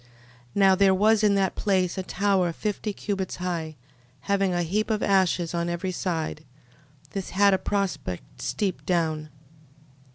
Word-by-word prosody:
13:5. - - -26 0.5
Now 195 -1 +5
there 190 0 +4
was 215 +2 +3
in 205 -1 +4
that 195 -2 +1
place 185 -3 +1
a 190 - -2
tower 190 -2 +1
fifty 210 +4 -3
cubits 195 -2 -3
high, 170 -3 -3 0.5
having 195 -1 +1
a 175 0 0
heap 210 +6 -1
of 215 -1 0
ashes 185 -3 +2
on 170 0 -1
every 175 +2 -2
side: 165 -4 -3 0.7
this 195 -2 -4
had 200 +1 +4
a 190 - +2
prospect 145 - -3
steep 195 -4 -2
down. 160 -4 0
190 Hz, 155 wpm, -26 LUFS, 170-200 Hz, 0.7 s, Now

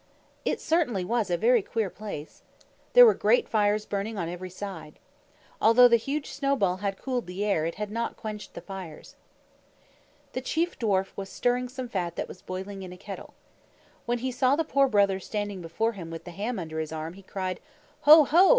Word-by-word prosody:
It - - 0
certainly 250 - +1
was 225 -1 0
a 175 - +1
very 235 +4 +4
queer 210 -1 -2
place! 200 -8 -8 0.5
There - - +10
were 450 - +7
great - - +2
fires 210 -1 +1
burning 205 +2 -3
on 170 -3 -2
every 180 +1 -6
side. 180 -5 -8 0.6
Although 230 +3 +8
the 235 - +5
huge 280 +6 -3
snowball 265 -10 +1
had 195 0 -3
cooled 250 -5 -3
the 185 +3 -3
air, 165 -6 +1
it 165 - -4
had 210 0 -4
not 230 +1 -3
quenched 215 -1 -7
the - - -6
fires. 185 -6 -9 1.2
The 255 - -2
Chief 330 +6 -1
Dwarf 195 -5 +1
was 195 -1 -6
stirring 245 +4 0
some 255 0 -6
fat 180 -6 -3
that - - -3
was - - -11
boiling 190 +2 -6
in 185 -1 -8
a 180 - -10
kettle. 185 - -9 0.7
When 240 0 +1
he 255 +2 -2
saw 255 +2 +3
the 325 - +1
Poor 275 -2 +3
Brother 200 -4 +3
standing 205 -1 -4
before 200 +8 -1
him 180 -7 -8
with 165 0 -7
the 175 - -9
ham 210 +6 -3
under 160 -3 -4
his 155 -1 -3
arm, 160 +1 -5
he 195 - -13
cried, 185 -1 -4 0.4
"Ho, 305 +1 +9
ho! 345 +7 +5
205 Hz, 195 wpm, -27 LUFS, 185-245 Hz, 1.2 s, There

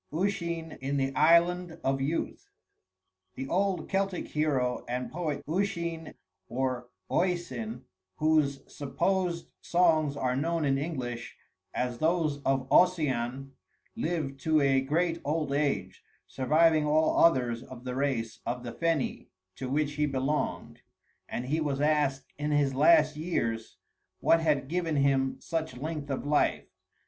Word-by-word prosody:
IV 155 - -4
USHEEN 170 -5 -3
IN 140 +2 -1
THE 135 0 0
ISLAND 170 +2 +3
OF 135 0 0
YOUTH 150 +5 -3 0.9
The 135 - -5
old 190 +3 0
Celtic 195 -1 -1
hero 135 -5 0
and 125 +1 -3
poet 160 -4 -3
Usheen 170 -2 -2 0.3
or 125 -1 -2 0.2
Oisin, 130 -10 -1 0.3
whose 155 -3 +2
supposed 170 +5 -1
songs 160 -5 +2
are 125 -2 0
known 165 +3 0
in 135 -1 +2
English 125 -6 -4 0.3
as 125 -1 -2
those 160 -2 +1
of 135 -1 0
Ossian, 135 -7 +2 0.4
lived 160 -10 -2
to 155 +3 +2
a 135 -2 +3
great 165 +5 0
old 150 -1 -1
age, 120 -11 -1 0.2
surviving 155 +3 +3
all 155 +1 +3
others 125 -7 +3
of 125 -1 -11
the 125 -1 -4
race 130 -4 -1
of 120 +1 -3
the 120 - -6
Feni, 165 -5 -1 0.3
to 130 - -4
which 145 +2 0
he 150 0 +2
belonged; 135 +2 -2 0.5
and 120 - -3
he 155 +5 0
was 140 -3 -1
asked 145 -3 +1
in 150 +1 -1
his 145 -2 +2
last 155 +1 +5
years 115 -9 -2 0.4
what 165 - +4
had 150 -4 +1
given 165 0 -1
him 135 -1 +2
such 160 -6 -3
length 150 +1 -4
of 135 - -3
life. 145 0 +2
150 Hz, 135 wpm, -29 LUFS, 135-165 Hz, 0.9 s, last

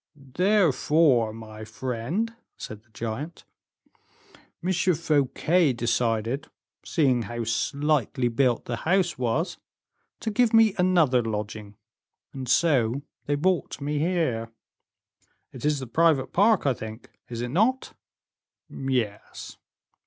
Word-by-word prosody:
"Therefore, 150 - +2
my 110 -1 -10
friend," 130 - -3 0.2
said 110 -1 -8
the 115 - -34
giant, 115 +9 -6 1.2
"M. 185 +2 +1
Fouquet 165 -2 +2
decided, 120 +1 -1 0.4
seeing 130 -7 +2
how 115 +2 -4
slightly 130 +3 0
built 120 0 +1
the 120 - -3
house 175 0 +1
was, 130 +8 -1 0.6
to 220 - -2
give 235 +1 +3
me 225 -3 +6
another 170 -9 +4
lodging, 105 -2 -5 0.6
and 130 -3 -6
so 135 -5 +2 0.2
they 145 - +1
brought 180 +4 0
me 145 +1 -2
here." 150 -10 0 1.0
"It 130 - -8
is 150 -1 +2
the 130 - -5
private 150 +1 +2
park, 205 -1 +4
I 135 - +3
think, 110 0 -9 0.2
is 120 -1 -5
it 120 - -3
not?" 225 - +1 0.8
"Yes." 125 -6 -3
135 Hz, 115 wpm, -26 LUFS, 115-170 Hz, 1.2 s, me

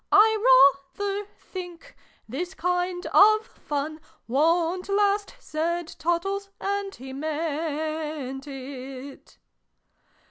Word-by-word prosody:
"I 440 - +7 0.2
rayther 405 0 -2
think 365 +6 -9 0.3
this 345 - -4
kind 360 +1 -1
of 430 +2 +7
fun 310 -8 -4 0.3
Wont 335 +8 +2
last!" 405 +2 +1
said 340 -5 -2
Tottles 390 +4 -1
(and 400 0 -3
lie 265 +1 -8
meant 305 -2 -3
if). 270 0 -8
340 Hz, 85 wpm, -26 LUFS, 295-395 Hz, 0.3 s, I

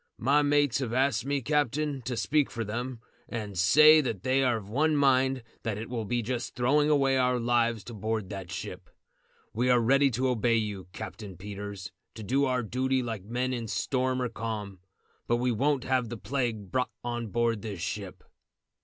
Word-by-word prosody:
"My 140 +5 +3
mates 145 -2 +2
have 120 -4 -3
asked 130 -1 +1
me, 140 -2 0
captain, 145 0 0
to 125 -2 -3
speak 145 +3 +2
for 115 - -4
them, 120 +3 -4 0.3
and 105 -4 -5
say 150 - +7
that 115 -9 -4
they 130 +1 +2
are 125 -3 +2
of 100 -3 -9
one 150 +8 +1
mind 135 -2 +3 0.2
that 110 -3 -3
it 110 +3 -7
will 115 -3 -2
be 120 +2 -1
just 120 +1 -3
throwing 145 +5 +3
away 135 -3 +3
our 125 -1 +2
lives 115 -2 +1
to 120 - -9
board 110 -1 -3
that 95 -3 -6
ship. - - -7 0.6
We 125 +3 +1
are 125 -1 +5
ready 135 +4 +4
to 130 +2 0
obey 120 -1 +2
you, 105 -4 -2
Captain 100 -3 -8
Peters, 100 0 -7 0.2
to 110 - -7
do 135 +7 +2
our 125 -2 0
duty 130 +3 0
like 110 -5 -5
men 125 +3 -1
in 120 -2 -3
storm 130 +3 0
or 125 - -1
calm, 110 -4 -5 0.5
but 120 - +2
we 125 +1 +1
won't 135 +3 +1
have 130 -3 0
the 120 - -5
plague 115 -6 -3
brought 125 -1 0
on 120 -1 -3
board 115 0 0
this 100 -5 -6
ship." 95 +1 -5
120 Hz, 190 wpm, -28 LUFS, 110-130 Hz, 0.6 s, say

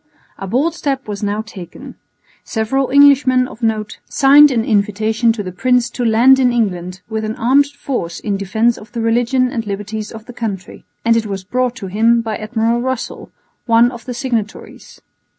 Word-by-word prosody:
A 195 - -5
bold 275 - 0
step 275 -6 -3
was 205 -1 -5
now 205 +1 -2
taken. 185 -6 -11 0.5
Several 255 +4 -1
Englishmen 270 -2 +5
of 240 - -13
note 220 -2 -2
signed 290 +2 +6
an 230 -4 0
invitation 220 +1 +1
to 215 -2 -5
the 185 - -6
prince 245 +5 +1
to 245 - -4
land 240 +4 +5
in 250 -2 +3
England 185 -6 -2
with 220 0 -3
an 215 0 -3
armed 265 +5 +3
force 265 -11 -5
in 205 -2 -2
defence 220 +5 0
of 210 - -15
the 235 - -3
religion 245 +3 +1
and 230 -4 -4
liberties 205 +1 -5
of 225 -1 -10
the 245 - -11
country; 205 -6 -6 0.2
and 230 0 +4
it 225 -1 0
was 195 -2 -5
brought 250 +4 -1
to 230 - -8
him 225 +5 +2
by 220 -1 -3
Admiral 225 +2 -1
Russell, 260 -1 -4 0.4
one 235 +1 +4
of 240 -1 -11
the 250 -1 -5
signatories. 230 -4 -5
230 Hz, 185 wpm, -17 LUFS, 210-255 Hz, 0.5 s, signed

